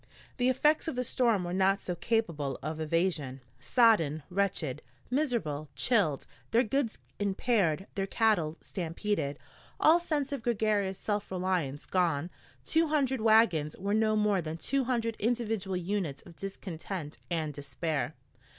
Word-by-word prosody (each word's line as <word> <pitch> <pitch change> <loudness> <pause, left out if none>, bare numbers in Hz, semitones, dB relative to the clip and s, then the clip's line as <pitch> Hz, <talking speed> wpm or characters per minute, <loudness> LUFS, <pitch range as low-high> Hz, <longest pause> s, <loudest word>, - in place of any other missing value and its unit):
The 245 +1 +3
effects 300 +5 +3
of 320 - -2
the 250 - 0
storm 235 -5 +2
were 175 0 -3
not 195 +1 +3
so 180 - -3
capable 170 -8 -1
of 155 +2 -3
evasion. 155 -4 0 0.2
Sodden, 160 - +3
wretched, 180 -8 -1 0.3
miserable, 230 - -1
chilled, 195 - +2 0.2
their 235 +2 +4
goods 245 0 -1 0.2
impaired, 195 -4 +1
their 195 -1 -2
cattle 185 -9 +2
stampeded, 170 -4 -2 0.4
all 320 +3 +6
sense 300 -5 -1
of 280 -3 -3
gregarious 210 -4 +1
self 205 0 -2
reliance 180 -7 -1
gone, 170 -3 0 0.3
two 325 0 +3
hundred 270 -5 +1
wagons 215 -9 +4
were 200 +2 -1
no 215 0 +3
more 210 -3 +2
than 160 0 -5
two 275 +9 0
hundred 230 -3 0
individual 220 -4 0
units 180 -6 -2
of 170 - -14
discontent 185 -4 -6
and 160 -3 -1
despair. 140 -1 -3
195 Hz, 140 wpm, -30 LUFS, 160-230 Hz, 0.4 s, all